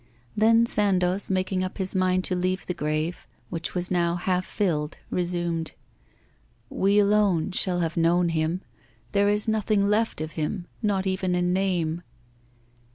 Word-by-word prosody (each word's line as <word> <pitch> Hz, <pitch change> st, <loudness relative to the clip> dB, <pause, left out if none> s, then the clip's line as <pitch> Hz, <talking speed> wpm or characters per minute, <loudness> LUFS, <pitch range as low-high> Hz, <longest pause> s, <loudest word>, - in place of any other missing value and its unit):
Then 225 Hz, +2 st, +5 dB
Sandoz, 195 Hz, -3 st, +1 dB
making 185 Hz, 0 st, 0 dB
up 185 Hz, -, -5 dB
his 190 Hz, -2 st, 0 dB
mind 185 Hz, -1 st, +2 dB
to 185 Hz, -, -1 dB
leave 185 Hz, +1 st, -1 dB
the 180 Hz, -, -2 dB
grave, 155 Hz, +2 st, -2 dB, 0.2 s
which 165 Hz, +1 st, -4 dB
was 180 Hz, 0 st, -1 dB
now 170 Hz, -1 st, +2 dB
half 180 Hz, +1 st, -1 dB
filled, 160 Hz, -7 st, -1 dB
resumed: 175 Hz, -2 st, -1 dB, 1.0 s
'We 200 Hz, +2 st, +2 dB
alone 200 Hz, -4 st, +3 dB
shall 180 Hz, -1 st, 0 dB
have 165 Hz, -1 st, -1 dB
known 170 Hz, +1 st, +3 dB
him. 165 Hz, +2 st, -1 dB, 0.5 s
There 200 Hz, 0 st, +3 dB
is 210 Hz, +1 st, +1 dB
nothing 215 Hz, -2 st, +1 dB
left 215 Hz, -1 st, +1 dB
of 155 Hz, 0 st, -4 dB
him, 170 Hz, +4 st, -3 dB, 0.2 s
not 200 Hz, -3 st, 0 dB
even 185 Hz, -1 st, 0 dB
a 180 Hz, -, +1 dB
name! 175 Hz, -3 st, 0 dB
185 Hz, 150 wpm, -25 LUFS, 170-200 Hz, 1.0 s, Then